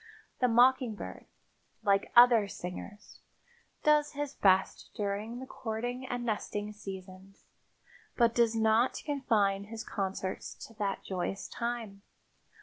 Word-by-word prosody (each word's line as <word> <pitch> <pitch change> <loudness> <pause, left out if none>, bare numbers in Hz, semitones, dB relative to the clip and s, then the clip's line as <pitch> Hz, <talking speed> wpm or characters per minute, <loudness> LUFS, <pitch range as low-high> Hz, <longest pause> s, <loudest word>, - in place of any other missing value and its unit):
The 250 - +4
mockingbird, 245 -1 +2 0.6
like 200 -1 +2
other 240 -3 +7
singers, 200 +3 -8 0.6
does 300 -1 +3
his 290 0 -3
best 190 -4 +2
during 210 +3 -3
the 260 - -7
courting 245 +2 -4
and 245 -1 -3
nesting 210 -1 -3
seasons, 190 -1 -10 0.7
but 235 -2 +4
does 230 -1 +3
not 225 +2 +2
confine 215 -9 +1
his 220 +1 -7
concerts 190 -2 -4
to 225 - -15
that 200 -2 -2
joyous 190 +1 -3
time. 235 -4 -4
220 Hz, 115 wpm, -31 LUFS, 200-245 Hz, 0.7 s, other